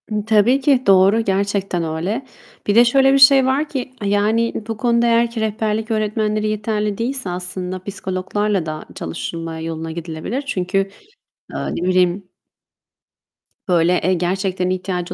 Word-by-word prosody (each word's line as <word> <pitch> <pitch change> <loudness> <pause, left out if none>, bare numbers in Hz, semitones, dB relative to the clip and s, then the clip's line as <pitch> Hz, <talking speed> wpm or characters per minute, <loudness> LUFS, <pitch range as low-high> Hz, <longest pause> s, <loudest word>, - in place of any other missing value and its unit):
Imm, 210 -1 -1
tabii 220 +4 +4
ki 265 -2 +3
doğru. 195 +3 +5
Gerçekten 195 -3 -1
öyle. 175 - -3 0.4
Bir 205 - +2
de 240 +1 +7
şöyle 270 +2 +4
bir - - +5
şey 270 -1 +7
var 275 +3 0
ki, 260 -2 -5
yani, 210 +3 +1
bu 225 -2 -4
konuda 235 +1 +2
eğer 235 0 +3
ki 230 -1 -4
rehberlik 220 +1 -2
öğretmenleri 215 0 0
yeterli 210 -1 -2
değilse 250 -3 -3
aslında 180 +1 -4
psikologlarla 190 0 -2
da 155 -1 -6
çalışılma 165 - -5
yoluna 160 0 -5
gidilebilir. 165 - -4
Çünkü, 185 -5 -1 0.8
eee, - - -4 0.2
ne 180 - -2
bileyim 185 +1 +1 1.4
Böyle, 175 0 +2
eee, 185 - +2
gerçekten 185 +1 -1
ihtiyacı 185 -1 -3
205 Hz, 145 wpm, -19 LUFS, 180-230 Hz, 1.4 s, de